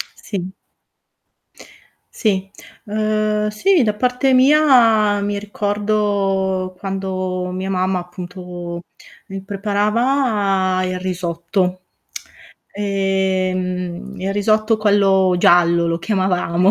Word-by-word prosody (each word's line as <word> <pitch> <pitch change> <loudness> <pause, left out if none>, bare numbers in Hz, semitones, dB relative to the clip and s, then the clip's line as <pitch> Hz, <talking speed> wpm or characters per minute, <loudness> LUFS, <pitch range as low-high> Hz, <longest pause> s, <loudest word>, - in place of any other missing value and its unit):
Sì 190 -2 -6 1.6
Sì 195 -4 -1 0.3
uhm 215 0 0
sì 345 - +2
da 210 -3 +1
parte 250 +4 +1
mia 245 -7 +4
mi 205 0 -2
ricordo 200 -2 -1
quando 185 -2 -3
mia 185 +1 -4
mamma 185 0 0
appunto 175 -1 -7 0.5
mi 195 0 -6
preparava 205 -1 0
il 185 0 -2
risotto. 180 0 -2 0.9
Ehm 185 -3 -2
il 195 +1 -2
risotto 215 +2 +2
quello 195 -3 +3
giallo 170 -1 +4
lo 165 0 -1
chiamavamo, 185 -2 +1
195 Hz, 85 wpm, -19 LUFS, 185-210 Hz, 1.6 s, mia